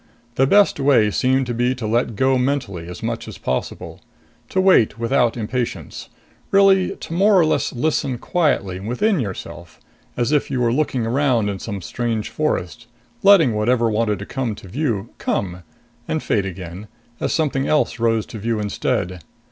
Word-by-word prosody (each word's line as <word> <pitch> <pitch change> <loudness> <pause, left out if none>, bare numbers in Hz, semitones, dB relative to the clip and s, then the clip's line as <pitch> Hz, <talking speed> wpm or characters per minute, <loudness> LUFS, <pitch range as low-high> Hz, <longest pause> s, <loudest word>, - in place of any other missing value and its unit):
The 135 +2 +2
best 200 -1 +4
way 130 -7 +4
seemed 130 +4 +1
to 120 - -3
be 120 +2 0
to 120 -3 -6
let 115 +1 0
go 130 +3 +2
mentally 125 -11 -2
as 90 - -9
much - - -3
as - - -8
possible; 65 - -4 0.5
to 190 - 0
wait 185 - +4
without 115 0 +1
impatience, 120 +2 -4 0.4
really 195 -1 +4
to - - -8
more 200 +3 +4
or 165 - +4
less 155 - 0
listen 130 -1 -1
quietly 120 - 0
within 135 - 0
yourself, 95 -6 -7 0.4
as 120 +3 0
if 150 -2 +1
you 130 -2 -1
were 120 -1 +2
looking 130 -4 0
around 120 -3 +1
in 100 -1 -4
some 100 -3 -6
strange 115 +1 -2
forest, 120 - -2 0.3
letting 195 - +6
whatever 115 +2 +1
wanted 105 -1 0
to 100 - -7
come 120 -3 -3
to 100 - -12
view 115 - -2
come, 90 -2 -2 0.5
and 160 - -2
fade 100 -3 0
again, 90 +2 -8 0.3
as - - -1
something 140 -4 0
else 150 -5 +1
rose 115 -2 +1
to 110 - -9
view 115 +1 -1
instead. 90 -3 -2
120 Hz, 170 wpm, -21 LUFS, 105-140 Hz, 0.5 s, letting